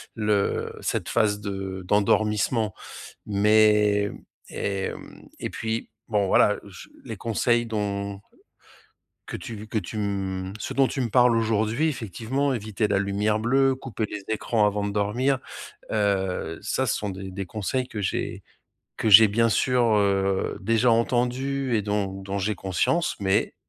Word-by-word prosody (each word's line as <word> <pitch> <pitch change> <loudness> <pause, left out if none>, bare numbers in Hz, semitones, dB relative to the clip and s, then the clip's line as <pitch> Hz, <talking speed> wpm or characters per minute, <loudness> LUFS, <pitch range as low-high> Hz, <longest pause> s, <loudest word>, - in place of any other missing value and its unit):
le 105 -2 0
cette - - -2
phase 105 -3 +2
de 95 -2 -5
d'endormissement 105 +1 +2 0.5
mais 105 0 +4
mmh - - -10 0.3
et 100 -1 -2
mmh - - -12
et - - -3
puis 110 0 -3 0.2
bon 105 -3 +1
voilà 105 +2 +4
je 100 -2 -12 0.2
les 115 -3 -5
conseils 120 +2 +1
dont 100 -2 -3 1.1
que - - -5
tu 115 - -7
v 105 +1 -9
que 110 - -2
tu, 105 +3 -7
mmh, 95 -2 -3
ce - - -4
dont 135 -1 +3
tu 135 - -4
me 125 - 0
parles 125 0 +4
aujourd'hui 110 +6 +1
effectivement 130 - -2
éviter 110 -2 -2
la 100 -1 +2
lumière 105 +2 0
bleue, 135 +3 +3
couper 120 -5 -4
les 105 -1 -6
écrans 110 0 +1
avant 105 0 0
de 100 - -2
dormir, 120 +7 +1 0.5
heu, 95 -5 -1
ça 130 - -1
ce - - +1
sont 105 - -3
des 95 0 -7
des 95 +1 -4
conseils 110 +6 -2
que 110 - -5
j'ai 95 - -3 0.5
que 110 - 0
j'ai 110 +2 +10
bien 115 +3 +2
sûr, 125 +2 +2
heu, 95 -1 +1
déjà 115 +2 +2
entendu 125 +3 0
et 105 - +2
dont 100 -2 -2
dont 95 +1 -3
j'ai 105 +2 -1
conscience 95 - 0
mais 95 +1 +1
105 Hz, 155 wpm, -25 LUFS, 100-115 Hz, 1.1 s, j'ai